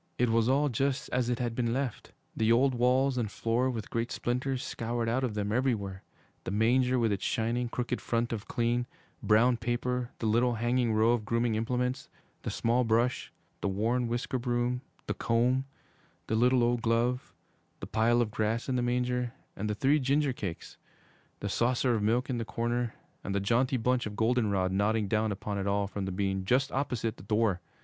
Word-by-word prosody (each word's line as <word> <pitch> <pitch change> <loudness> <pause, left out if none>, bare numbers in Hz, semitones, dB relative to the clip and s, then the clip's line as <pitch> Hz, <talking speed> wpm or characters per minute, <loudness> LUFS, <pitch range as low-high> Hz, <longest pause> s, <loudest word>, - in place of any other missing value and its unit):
It 125 -1 +2
was 115 +1 +3
all 140 +3 +3
just 135 +1 -1
as 125 -1 0
it 120 - 0
had 120 -1 -2
been 115 -1 0
left, 130 -3 -3 0.2
the 110 0 +2
old 130 +3 +4
walls 125 +2 +2
and 110 -3 -1
floor 120 +4 0
with 115 -4 -5
great 115 0 -1
splinters 125 +1 -2
scoured 115 0 -3
out 125 +3 0
of 115 -5 -1
them 105 -1 -1
everywhere; 105 -6 -1 0.4
the - - -4
manger 125 +5 +2
with 115 -3 +2
its 100 - -2
shining, 120 +2 0
crooked 125 +1 -2
front 115 0 -1
of 105 -3 -5
clean, 120 +1 0 0.3
brown 120 +3 +4
paper; 120 +1 -2
the - - -4
little 120 +3 +2
hanging 120 +1 +1
row 110 +1 +4
of 120 -3 +1
grooming 115 +1 0
implements: 125 +4 -1 0.3
the - - -4
small 120 +2 +1
brush, 120 +2 +1 0.3
the - - 0
worn 115 +5 0
whisk 120 +1 -2
broom, 125 -1 0 0.2
the - - -1
comb, 125 +3 +1 0.6
the 110 - -1
little 125 +2 +4
old 120 0 +1
glove, 120 +2 0 0.5
the - - -5
pile 115 +2 +2
of 110 - -5
grass 110 +2 -1
in 130 -1 0
the - - +1
manger, 125 0 0 0.2
and 105 +2 -3
the 105 - -1
three 140 +7 +3
ginger 140 +1 +1
cakes, 95 -8 -6 0.6
the 100 - -2
saucer 120 +4 +1
of 110 - 0
milk 115 +4 +1
in 125 -3 -2
the - - -1
corner 120 +1 -2 0.3
and 100 - -3
the - - +2
jaunty 120 +6 +2
bunch 125 0 +1
of 105 - -7
goldenrod 105 -5 +1
nodding 105 +2 +1
down 110 +1 +1
upon 100 0 -3
it 100 - -2
all 100 0 +1
from 100 0 -4
the 95 - -3
beam 95 0 -1
just 130 +7 +2
opposite 125 -5 -2
the - - -12
door. 105 -3 +1
120 Hz, 195 wpm, -30 LUFS, 110-125 Hz, 0.6 s, old